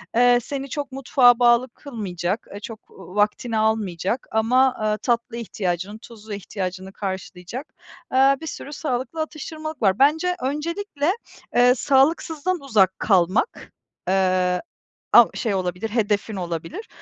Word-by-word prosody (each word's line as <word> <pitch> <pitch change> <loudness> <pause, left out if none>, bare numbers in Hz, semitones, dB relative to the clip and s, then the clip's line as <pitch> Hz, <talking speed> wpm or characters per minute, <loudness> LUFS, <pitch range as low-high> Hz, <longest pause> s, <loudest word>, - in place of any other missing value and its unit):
eee, 245 0 +5
seni 275 +1 -5
çok 285 +1 -4
mutfağa 255 -2 +4
bağlı 240 +1 +4
kılmayacak, 200 - -4
eee, 200 - -6
çok 220 +1 -10
va 185 0 -13
vaktini 215 +2 +1
almayacak 215 -1 0
ama, 250 +4 +3
aaa, 215 -2 -1
tatlı 235 0 -1
ihtiyacını, 200 -2 -3
tuzlu 220 -2 -11
ihtiyacını 190 -1 -5
karşılayacak, 190 - -6 0.4
eee, 270 +1 +5
bir 320 - -6
sürü 295 - -7
sağlıklı 265 +1 -3
atıştırmalık 310 -1 -6
var. 195 -2 +3
Bence 320 +6 +3
öncelikle, 300 +3 -1 0.4
eee, 245 +1 +6
sağlıksızdan 305 +6 +1
uzak 205 -9 +2
kalmak, 190 - +1 0.4
eee, 185 -1 +2 0.5
av - - +9
şey 220 -5 -1
olabilir, 185 +3 -2
hedefin 210 -1 0
olabilir. 180 - -5
230 Hz, 125 wpm, -23 LUFS, 195-275 Hz, 0.5 s, av